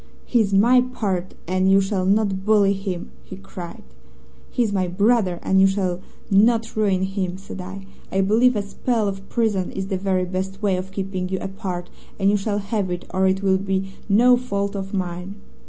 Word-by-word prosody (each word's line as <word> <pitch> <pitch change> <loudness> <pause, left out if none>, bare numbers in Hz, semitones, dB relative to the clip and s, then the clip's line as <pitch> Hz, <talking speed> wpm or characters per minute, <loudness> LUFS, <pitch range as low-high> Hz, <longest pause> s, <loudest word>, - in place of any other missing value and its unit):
"'He's 220 -5 +2
my 235 +6 +5
pard, 200 -8 -3
and 185 +1 +2
you 195 0 +6
shall 195 -1 0
not 195 -1 +1
bully 205 -1 +4
him,' 190 -3 -5
he - - -9
cried. 180 -3 -9 0.7
"'He's 230 -4 0
my 185 -2 +1
brother, 200 0 +2
and 190 0 +3
you 195 - +7
shall 185 -2 -1 0.3
not 225 +3 +3
ruin 195 -4 +2
him,' 190 -1 -2
said 195 0 -8
I. 190 +1 -8 0.3
'I 195 - +2
believe 225 +6 +4
a 205 - 0
spell 220 +2 -1
of 195 0 -5
prison 210 -6 0
is 195 0 -4
the 190 - -1
very 185 -1 0
best 190 +1 -4
way 200 -3 +1
of 185 +1 -5
keeping 190 -1 -3
you 190 - -1
apart, 185 -2 -5 0.3
and 195 0 +3
you 205 - +3
shall 205 +1 -1
have 200 -1 -2
it, 175 0 -4
or 190 0 +3
it 190 +1 0
will 190 -1 +3
be 195 0 -2 0.2
no 245 +5 +6
fault 200 -5 -2
of 195 -1 -4
mine.' 180 0 -4
195 Hz, 190 wpm, -22 LUFS, 190-205 Hz, 0.7 s, you